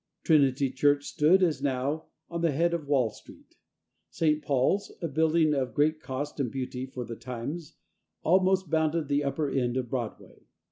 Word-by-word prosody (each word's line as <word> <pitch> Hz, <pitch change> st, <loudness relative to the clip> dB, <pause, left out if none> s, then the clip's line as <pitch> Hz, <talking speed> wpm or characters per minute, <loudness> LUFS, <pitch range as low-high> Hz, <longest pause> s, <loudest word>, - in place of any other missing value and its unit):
Trinity 140 Hz, -4 st, +3 dB
Church 145 Hz, +2 st, +2 dB
stood, 175 Hz, +6 st, +3 dB
as 155 Hz, -6 st, +1 dB
now, 140 Hz, +3 st, -1 dB, 0.3 s
at 170 Hz, 0 st, -3 dB
the 170 Hz, -, +3 dB
head 170 Hz, +4 st, +1 dB
of 160 Hz, -4 st, -3 dB
Wall 130 Hz, -6 st, +2 dB
Street. -, -, -17 dB, 0.5 s
St. 155 Hz, -2 st, +1 dB
Paul's 145 Hz, +10 st, +1 dB
a 170 Hz, -, -2 dB
building 160 Hz, +1 st, +2 dB
of 130 Hz, -5 st, -2 dB
great 155 Hz, +2 st, +2 dB
cost 145 Hz, +2 st, -5 dB
and 130 Hz, -4 st, 0 dB
beauty 130 Hz, 0 st, -4 dB
for 125 Hz, -2 st, -6 dB
the 115 Hz, -, -6 dB
times 130 Hz, +7 st, -6 dB, 0.5 s
almost 185 Hz, 0 st, +3 dB
bounded 160 Hz, -1 st, +1 dB
the 145 Hz, 0 st, +1 dB
upper 145 Hz, +2 st, -1 dB
end 125 Hz, -2 st, 0 dB
of 125 Hz, -3 st, -3 dB
Broadway. 120 Hz, -4 st, -6 dB
145 Hz, 170 wpm, -28 LUFS, 130-160 Hz, 0.5 s, Trinity